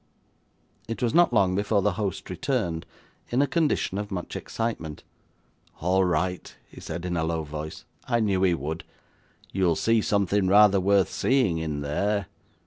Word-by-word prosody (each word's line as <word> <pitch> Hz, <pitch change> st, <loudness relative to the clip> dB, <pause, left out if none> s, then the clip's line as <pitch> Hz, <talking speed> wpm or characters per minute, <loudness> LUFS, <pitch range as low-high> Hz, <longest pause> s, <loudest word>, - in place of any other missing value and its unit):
It 115 Hz, +2 st, -4 dB
was 120 Hz, -, +1 dB
not 175 Hz, -3 st, +5 dB
long 100 Hz, -5 st, +3 dB
before 100 Hz, 0 st, +1 dB
the 105 Hz, -, +3 dB
host 100 Hz, -1 st, -4 dB
returned, 80 Hz, -1 st, -2 dB, 0.4 s
in 120 Hz, -, 0 dB
a 140 Hz, -, +5 dB
condition 145 Hz, -, 0 dB
of 105 Hz, 0 st, -4 dB
much 90 Hz, -3 st, -5 dB
excitement. 95 Hz, -10 st, -4 dB, 0.8 s
'All 95 Hz, +3 st, +2 dB
right,' 90 Hz, 0 st, -1 dB
he -, -, -13 dB
said 85 Hz, +2 st, -5 dB
in 90 Hz, -1 st, -2 dB
a 80 Hz, -, 0 dB
low 80 Hz, 0 st, -1 dB
voice. 75 Hz, +1 st, -7 dB, 0.2 s
'I 120 Hz, -2 st, +1 dB
knew 100 Hz, -4 st, +1 dB
he 90 Hz, -3 st, +3 dB
would. 80 Hz, +2 st, -4 dB, 0.7 s
You'll 90 Hz, -3 st, +2 dB
see 115 Hz, +6 st, +2 dB
something 100 Hz, -1 st, +1 dB
rather 100 Hz, 0 st, +6 dB
worth 100 Hz, 0 st, +3 dB
seeing, 125 Hz, -11 st, +1 dB
in 75 Hz, -2 st, -3 dB
there. 100 Hz, +8 st, 0 dB
95 Hz, 160 wpm, -26 LUFS, 85-105 Hz, 0.8 s, rather